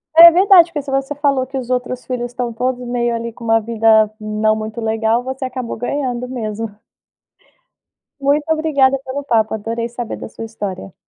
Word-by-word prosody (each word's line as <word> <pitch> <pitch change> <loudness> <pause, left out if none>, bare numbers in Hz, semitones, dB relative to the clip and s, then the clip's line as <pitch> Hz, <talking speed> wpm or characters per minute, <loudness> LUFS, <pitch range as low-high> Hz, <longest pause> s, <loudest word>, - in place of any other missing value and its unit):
É 335 +1 +11
verdade 365 -1 +6
porque 295 -3 -3
se 275 - -7
você 270 +1 -1
falou, 275 -3 +1
que 270 0 -5
os 250 -1 -5
outros 250 0 -2
filhos 245 -1 -4
estão 245 -1 -3
todos 250 +1 -2
meio 240 -1 0
ali 230 0 -4
com 235 - -13
uma 225 0 +3
vida 220 -1 +3
não 215 0 +1
muito 220 +1 -5
legal, 225 +1 0
você 265 +1 -5
acabou 255 -2 -5
ganhando 250 0 -2
mesmo. 225 -3 -4 1.5
Muito 285 +2 +1
obrigada 285 -4 +2
pelo 275 +2 -4
papo, 220 -5 +1
adorei 230 +2 -3
saber 240 -1 -5
da - - -8
sua 225 - -8
história. 200 -4 -6
245 Hz, 180 wpm, -18 LUFS, 225-270 Hz, 1.5 s, É